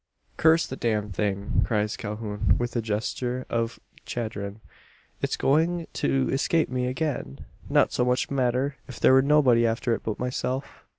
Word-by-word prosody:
"Curse 160 Hz, +1 st, +4 dB
the 130 Hz, -, -6 dB
damned 105 Hz, -5 st, -1 dB
thing!" 100 Hz, -1 st, 0 dB
cries 105 Hz, -1 st, 0 dB
Calhoun, 105 Hz, -1 st, -1 dB
with 120 Hz, 0 st, -3 dB
a 120 Hz, -, +1 dB
gesture 120 Hz, +4 st, -2 dB
of 115 Hz, 0 st, -1 dB, 0.2 s
chagrin. 110 Hz, -3 st, -5 dB, 0.6 s
"It's -, -, -1 dB
going 165 Hz, +4 st, +2 dB
to 135 Hz, -1 st, +1 dB
escape 155 Hz, +4 st, +1 dB
me 125 Hz, 0 st, -1 dB
again! 125 Hz, -, -3 dB, 0.2 s
Not -, -, +3 dB
so 125 Hz, -, +2 dB
much 125 Hz, +2 st, 0 dB
matter, 130 Hz, +1 st, 0 dB
if 130 Hz, -, -9 dB
there -, -, +5 dB
were 130 Hz, -, +7 dB
nobody 135 Hz, -5 st, +4 dB
after 115 Hz, +1 st, +1 dB
it -, -, -2 dB
but 110 Hz, -, -3 dB
myself. 125 Hz, +2 st, -3 dB
125 Hz, 160 wpm, -26 LUFS, 110-135 Hz, 0.6 s, were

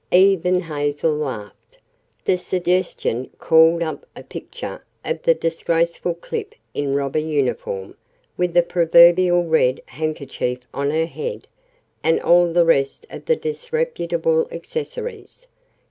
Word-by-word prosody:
Even 180 Hz, -1 st, +4 dB
Hazel 145 Hz, -1 st, -1 dB
laughed. 120 Hz, -9 st, -6 dB, 0.5 s
The -, -, +3 dB
suggestion 180 Hz, -8 st, -1 dB
called 165 Hz, +1 st, +4 dB
up 165 Hz, -, -5 dB
a -, -, -10 dB
picture -, -, -8 dB, 0.2 s
of 480 Hz, -, -2 dB
the -, -, +4 dB
disgraceful 170 Hz, -, -1 dB
Clip 435 Hz, -, -6 dB, 0.2 s
in 140 Hz, -1 st, -1 dB
robber 140 Hz, +1 st, 0 dB
uniform, 135 Hz, -10 st, -2 dB, 0.4 s
with 180 Hz, -1 st, -1 dB
the 175 Hz, -, +6 dB
proverbial 175 Hz, +1 st, +5 dB
red 140 Hz, -6 st, +2 dB
handkerchief 140 Hz, -4 st, -3 dB
on 140 Hz, 0 st, -1 dB
her 160 Hz, +2 st, +1 dB
head, 475 Hz, -, -6 dB, 0.6 s
and 160 Hz, -, +3 dB
all 175 Hz, 0 st, +4 dB
the 170 Hz, 0 st, +4 dB
rest 140 Hz, -, +1 dB
of -, -, -9 dB
the 480 Hz, -, +3 dB
disreputable 475 Hz, +1 st, -1 dB
accessories. 475 Hz, +1 st, -6 dB
170 Hz, 120 wpm, -21 LUFS, 150-190 Hz, 0.6 s, the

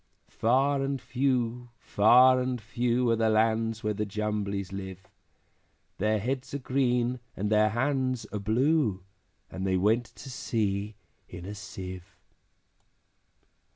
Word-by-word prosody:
Far 135 Hz, +4 st, +2 dB
and 135 Hz, 0 st, -1 dB
few, 125 Hz, -2 st, -1 dB
far 125 Hz, +5 st, +5 dB
and 125 Hz, -1 st, -2 dB
few, 120 Hz, +2 st, 0 dB
Are -, -, +3 dB
the 110 Hz, 0 st, +2 dB
lands 110 Hz, +1 st, +1 dB
where 105 Hz, 0 st, 0 dB
the 105 Hz, +1 st, -2 dB
Jumblies 100 Hz, -2 st, -3 dB
live; 95 Hz, -1 st, -7 dB, 0.9 s
Their 110 Hz, +2 st, +2 dB
heads 130 Hz, +6 st, -3 dB
are -, -, 0 dB
green, 125 Hz, -2 st, 0 dB, 0.2 s
and 105 Hz, +2 st, -2 dB
their 110 Hz, 0 st, +4 dB
hands 130 Hz, +1 st, -1 dB
are 105 Hz, -, -2 dB
blue, 110 Hz, -, +1 dB, 0.5 s
And 95 Hz, -, -5 dB
they 95 Hz, -1 st, +2 dB
went 110 Hz, +6 st, +2 dB
to 135 Hz, -, -11 dB
sea 105 Hz, -3 st, -2 dB, 0.3 s
in 90 Hz, 0 st, -9 dB
a 100 Hz, -, -6 dB
Sieve. 95 Hz, -2 st, -8 dB
115 Hz, 130 wpm, -28 LUFS, 100-125 Hz, 0.9 s, far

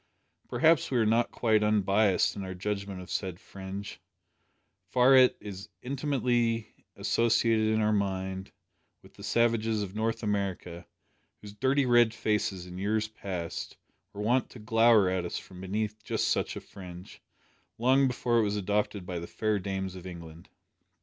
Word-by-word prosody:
Perhaps 155 Hz, +6 st, +3 dB
we 130 Hz, -, 0 dB
are 115 Hz, -, +3 dB
not 115 Hz, +2 st, +2 dB
quite 110 Hz, -3 st, +2 dB
un 105 Hz, -1 st, +2 dB
biassed 100 Hz, 0 st, +2 dB
in 100 Hz, -, -5 dB
our 95 Hz, -1 st, -6 dB
judgment 100 Hz, 0 st, -4 dB
of -, -, -9 dB
the -, -, -6 dB
said 90 Hz, -3 st, -3 dB
fringe, 95 Hz, +1 st, -8 dB, 0.9 s
far 125 Hz, +4 st, +5 dB
it 130 Hz, -1 st, +6 dB
is 100 Hz, 0 st, -8 dB
intimately 125 Hz, -5 st, 0 dB, 0.2 s
associated 115 Hz, -1 st, +2 dB
in 110 Hz, 0 st, +2 dB
our 110 Hz, 0 st, +2 dB
mind 95 Hz, -1 st, -2 dB, 0.5 s
with -, -, -18 dB
the -, -, -15 dB
savages 115 Hz, -2 st, +1 dB
of 95 Hz, -2 st, -7 dB
North 115 Hz, +1 st, -1 dB
America, 95 Hz, -4 st, -3 dB, 0.5 s
whose 105 Hz, -1 st, -11 dB
dirty 135 Hz, +5 st, +2 dB
red 120 Hz, -2 st, +4 dB
faces, 105 Hz, -4 st, -1 dB
in 90 Hz, 0 st, -8 dB
years 110 Hz, +2 st, 0 dB
past, 90 Hz, -6 st, -5 dB, 0.3 s
were 100 Hz, -, -7 dB
wont 125 Hz, +4 st, +2 dB
to -, -, -12 dB
glower 115 Hz, -2 st, +4 dB
at 90 Hz, -1 st, 0 dB
us 85 Hz, -, -4 dB
from 90 Hz, -1 st, -10 dB
beneath 105 Hz, +3 st, -3 dB
just -, -, 0 dB
such -, -, 0 dB
a -, -, -6 dB
fringe, 90 Hz, -1 st, -11 dB, 0.6 s
long 130 Hz, +3 st, +4 dB
before 120 Hz, -2 st, +1 dB
it -, -, +3 dB
was 105 Hz, 0 st, 0 dB
adopted 105 Hz, -1 st, -1 dB
by 90 Hz, -2 st, -4 dB
the 85 Hz, -, -7 dB
fair 110 Hz, -2 st, -1 dB
dames 95 Hz, -1 st, -3 dB
of 90 Hz, 0 st, -9 dB
England! 85 Hz, -2 st, -10 dB
105 Hz, 165 wpm, -29 LUFS, 95-115 Hz, 0.9 s, it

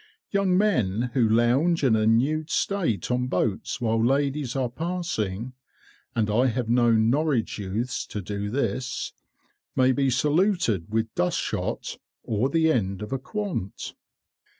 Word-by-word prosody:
Young 195 Hz, -2 st, +2 dB
men 125 Hz, -, +1 dB
who 120 Hz, -5 st, +3 dB
lounge 130 Hz, +9 st, +3 dB
in 125 Hz, -5 st, +4 dB
a 110 Hz, 0 st, +2 dB
nude 145 Hz, +8 st, +2 dB
state 175 Hz, -, 0 dB
on 125 Hz, 0 st, 0 dB
boats 100 Hz, -2 st, -1 dB
while 115 Hz, -1 st, +1 dB
ladies 140 Hz, +1 st, 0 dB
are 130 Hz, -2 st, +1 dB
passing 125 Hz, -, -3 dB, 0.6 s
(and 110 Hz, -2 st, +1 dB
I 115 Hz, +5 st, +3 dB
have 120 Hz, -1 st, -1 dB
known 115 Hz, -2 st, +4 dB
Norwich 145 Hz, -7 st, 0 dB
youths 105 Hz, +6 st, -3 dB
to 105 Hz, -, -5 dB
do 100 Hz, +1 st, -4 dB
this) 125 Hz, 0 st, -2 dB, 0.6 s
may 130 Hz, 0 st, +4 dB
be 135 Hz, +1 st, +1 dB
saluted 145 Hz, -, +1 dB
with 110 Hz, 0 st, -1 dB
dust 90 Hz, -, 0 dB
shot, -, -, -3 dB, 0.2 s
or 115 Hz, +4 st, 0 dB
the 160 Hz, +1 st, +3 dB
end 100 Hz, -6 st, -1 dB
of 105 Hz, -, -5 dB
a 135 Hz, -, -1 dB
quant. 190 Hz, -, -4 dB
125 Hz, 145 wpm, -25 LUFS, 110-145 Hz, 0.6 s, in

